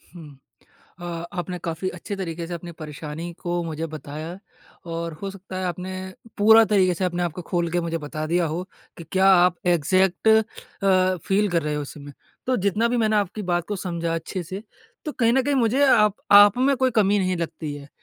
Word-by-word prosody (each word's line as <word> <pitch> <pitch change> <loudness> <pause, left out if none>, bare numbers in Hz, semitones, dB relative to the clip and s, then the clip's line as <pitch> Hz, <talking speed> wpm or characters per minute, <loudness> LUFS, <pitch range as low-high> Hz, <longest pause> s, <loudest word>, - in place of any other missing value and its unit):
हुँ। 150 -5 -12 0.6
अ, - - -8 0.3
आपने 180 0 -4
काफ़ी 165 +3 -2
अच्छे 185 +3 -6
तरीके 170 -3 -4
से 175 - -5
अपनी 170 0 -7
परेशानी 155 +2 -7
को 175 0 -1
मुझे 160 0 -4
बताया, 155 +3 -7 0.5
और 165 0 -4
हो 195 - -3
सकता 190 -1 -9
है 185 - -3
आपने 180 +1 -4 0.5
पूरा 220 +2 +7
तरीके 185 -3 +4
से 185 - -2
अपने 175 -1 -1
आप 175 - -1
को 180 - -7
खोल 170 0 -1
के 175 +1 0
मुझे 165 -1 -2
बता 155 +1 -5
दिया 170 +1 +1
हो 165 +4 -3 0.3
कि 170 - -9
क्या 190 0 +3
आप 180 0 +4
एग्ज़ैक्ट 185 +4 +2
अ, 220 0 +6 0.8
फ़ील 205 +2 +2
कर 170 -2 +1
रहे 150 0 -2
हो 150 - -2
इस 140 - -8
समय। 145 -1 -10 0.3
तो 255 - +2
जितना 210 +3 +1
भी 245 - 0
मैंने 220 -2 +2
आपकी 205 +1 -1
बात 175 -1 +1
को 205 - -2
समझा 170 -3 -3
अच्छे 170 +3 -4
से, 190 +5 -7 0.4
तो 300 - -3
कहीं 230 -2 +2
न 265 +1 +3
कहीं 285 +2 0
मुझे 255 +1 +2
आप 210 -5 +5 0.2
आप 205 +2 +8
में 270 +2 +3
कोई 260 0 +2
कमी 205 -3 +3
नहीं 185 -2 0
लगती 160 -3 -4
है। 140 0 -10
180 Hz, 210 wpm, -23 LUFS, 165-205 Hz, 0.8 s, आप